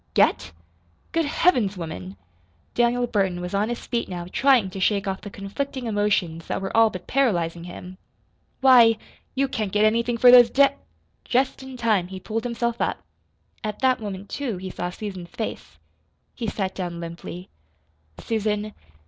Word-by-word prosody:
"Get? -, -, +3 dB, 0.6 s
Good 330 Hz, -1 st, +1 dB
Heavens 245 Hz, -, +2 dB
woman!" 95 Hz, -, -7 dB, 0.6 s
Daniel 240 Hz, +1 st, +2 dB
Burton 195 Hz, -6 st, 0 dB
was 180 Hz, +1 st, -5 dB
on 205 Hz, +3 st, +1 dB
his 240 Hz, -, -5 dB
feet 235 Hz, -1 st, -2 dB
now 175 Hz, -2 st, -5 dB
trying 250 Hz, -8 st, +3 dB
to 195 Hz, -, -6 dB
shake 200 Hz, +1 st, +1 dB
off 190 Hz, 0 st, -3 dB
the 205 Hz, -, -7 dB
conflicting 245 Hz, +7 st, -5 dB
emotions 205 Hz, -6 st, 0 dB
that -, -, -2 dB
were 195 Hz, +2 st, -4 dB
all 225 Hz, 0 st, +6 dB
but 185 Hz, -3 st, -8 dB
paralyzing 175 Hz, -11 st, 0 dB
him. 180 Hz, +1 st, -10 dB, 0.6 s
"Why, 240 Hz, -4 st, +7 dB, 0.4 s
you 275 Hz, +1 st, +2 dB
can't 215 Hz, -6 st, -3 dB
get 210 Hz, +2 st, +3 dB
anything 235 Hz, +2 st, +1 dB
for 245 Hz, +1 st, +8 dB
those 245 Hz, -1 st, +9 dB
da 280 Hz, 0 st, +5 dB, 0.3 s
" -, -, -43 dB
Just 265 Hz, +1 st, +2 dB
in 265 Hz, -1 st, -9 dB
time 215 Hz, -7 st, +1 dB
he 190 Hz, 0 st, -7 dB
pulled 225 Hz, +5 st, -4 dB
himself 235 Hz, 0 st, -2 dB
up. -, -, -1 dB, 0.6 s
At 215 Hz, -1 st, -3 dB
that 255 Hz, -2 st, +3 dB
moment, 200 Hz, -1 st, -6 dB
too, 255 Hz, -9 st, -3 dB
he 185 Hz, +1 st, -6 dB
saw 175 Hz, -, -3 dB
Susan's 185 Hz, -2 st, -7 dB
face. 220 Hz, -, -6 dB, 0.6 s
He 235 Hz, -, -4 dB
sat 195 Hz, -2 st, -2 dB
down 175 Hz, -2 st, -5 dB
limply. 170 Hz, +2 st, -8 dB, 0.7 s
"Susan." 215 Hz, -1 st, -2 dB
210 Hz, 165 wpm, -24 LUFS, 185-240 Hz, 0.7 s, those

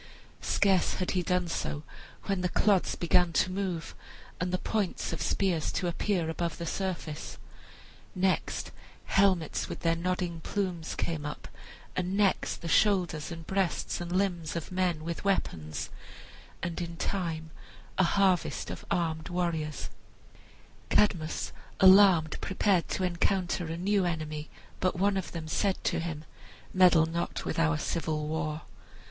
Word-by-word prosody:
Scarce 195 Hz, -3 st, +2 dB
had 185 Hz, -, -1 dB
he 185 Hz, -, +1 dB
done 180 Hz, 0 st, +1 dB
so 150 Hz, -2 st, -3 dB, 0.4 s
when 195 Hz, -2 st, -1 dB
the 180 Hz, -, +1 dB
clods 200 Hz, 0 st, +3 dB
began 175 Hz, 0 st, +3 dB
to 185 Hz, -, +2 dB
move, 185 Hz, -4 st, -3 dB, 0.5 s
and 180 Hz, 0 st, -1 dB
the 185 Hz, -, +1 dB
points 200 Hz, -3 st, -1 dB
of 165 Hz, -, -4 dB
spears 175 Hz, -2 st, +1 dB
to 180 Hz, -, -1 dB
appear 175 Hz, 0 st, 0 dB
above 165 Hz, 0 st, -2 dB
the 170 Hz, -, -4 dB
surface. 170 Hz, -4 st, -4 dB, 0.8 s
Next 185 Hz, 0 st, 0 dB, 0.3 s
helmets 190 Hz, -5 st, +2 dB
with -, -, -6 dB
their 165 Hz, 0 st, +2 dB
nodding 175 Hz, 0 st, -2 dB
plumes 180 Hz, -3 st, -2 dB
came 160 Hz, -3 st, -2 dB
up, 150 Hz, 0 st, -6 dB, 0.5 s
and 185 Hz, +2 st, -1 dB
next 200 Hz, -2 st, +1 dB
the -, -, -3 dB
shoulders 175 Hz, -4 st, +2 dB
and 165 Hz, -1 st, -7 dB
breasts 190 Hz, -2 st, -1 dB
and 175 Hz, 0 st, -5 dB
limbs 180 Hz, -4 st, 0 dB
of 170 Hz, +1 st, -4 dB
men 180 Hz, -4 st, 0 dB
with 170 Hz, +1 st, -4 dB
weapons, 80 Hz, -, -1 dB, 0.7 s
and 175 Hz, 0 st, -2 dB
in 170 Hz, -1 st, -5 dB
time 165 Hz, -4 st, -2 dB, 0.5 s
a -, -, +7 dB
harvest 190 Hz, -1 st, +2 dB
of -, -, -7 dB
armed 160 Hz, -1 st, -1 dB
warriors. 170 Hz, -4 st, -2 dB, 1.0 s
Cadmus, 170 Hz, -7 st, +2 dB, 0.3 s
alarmed, 185 Hz, -5 st, +7 dB
prepared 190 Hz, -2 st, +2 dB
to 190 Hz, -, -1 dB
encounter 180 Hz, 0 st, 0 dB
a 165 Hz, +1 st, -4 dB
new 195 Hz, +2 st, +2 dB
enemy, 155 Hz, -2 st, -3 dB, 0.3 s
but 185 Hz, -, +1 dB
one 200 Hz, +2 st, +2 dB
of 190 Hz, -2 st, -3 dB
them 160 Hz, -2 st, -5 dB
said 195 Hz, +4 st, +1 dB
to -, -, +1 dB
him, 160 Hz, -2 st, -4 dB, 0.5 s
"Meddle 180 Hz, -3 st, +6 dB
not 170 Hz, +1 st, -3 dB
with -, -, -2 dB
our 80 Hz, 0 st, +3 dB
civil 155 Hz, -, -2 dB
war." 155 Hz, 0 st, -2 dB
175 Hz, 145 wpm, -29 LUFS, 160-185 Hz, 1.0 s, a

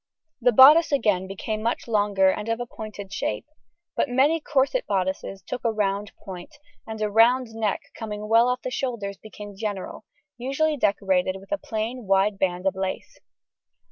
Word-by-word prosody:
] 315 Hz, -4 st, -56 dB
The 245 Hz, +1 st, +4 dB
bodice 295 Hz, +8 st, +8 dB
again 210 Hz, -9 st, +1 dB
became 215 Hz, +3 st, -4 dB
much 230 Hz, +2 st, -2 dB
longer 205 Hz, -3 st, +3 dB
and 210 Hz, +3 st, -5 dB
of 230 Hz, +1 st, -1 dB
a 245 Hz, -, -3 dB
pointed 210 Hz, -4 st, -9 dB
shape, 290 Hz, +7 st, -3 dB, 0.5 s
but -, -, 0 dB
many 275 Hz, +6 st, +3 dB
corset 300 Hz, -, 0 dB
bodices 190 Hz, 0 st, -2 dB
took 250 Hz, -, -5 dB
a 230 Hz, -, +2 dB
round 205 Hz, -1 st, -1 dB
point, 190 Hz, -, -9 dB, 0.3 s
and 220 Hz, -1 st, -6 dB
a 210 Hz, -, -1 dB
round 235 Hz, +2 st, +4 dB
neck 220 Hz, -3 st, -1 dB
coming 210 Hz, -2 st, -6 dB
well 230 Hz, +3 st, +5 dB
off 250 Hz, 0 st, -2 dB
the 255 Hz, -, -4 dB
shoulders 230 Hz, -7 st, -3 dB
became 210 Hz, -1 st, -10 dB
general, 205 Hz, 0 st, -5 dB, 0.3 s
usually 275 Hz, +5 st, 0 dB
decorated 190 Hz, -6 st, +1 dB
with 195 Hz, -, -17 dB
a 300 Hz, -, 0 dB
plain 225 Hz, +1 st, -4 dB
wide 195 Hz, +1 st, +2 dB
band 180 Hz, 0 st, -1 dB
of 195 Hz, -, +2 dB
lace. 190 Hz, 0 st, -5 dB
215 Hz, 175 wpm, -24 LUFS, 195-250 Hz, 0.5 s, bodice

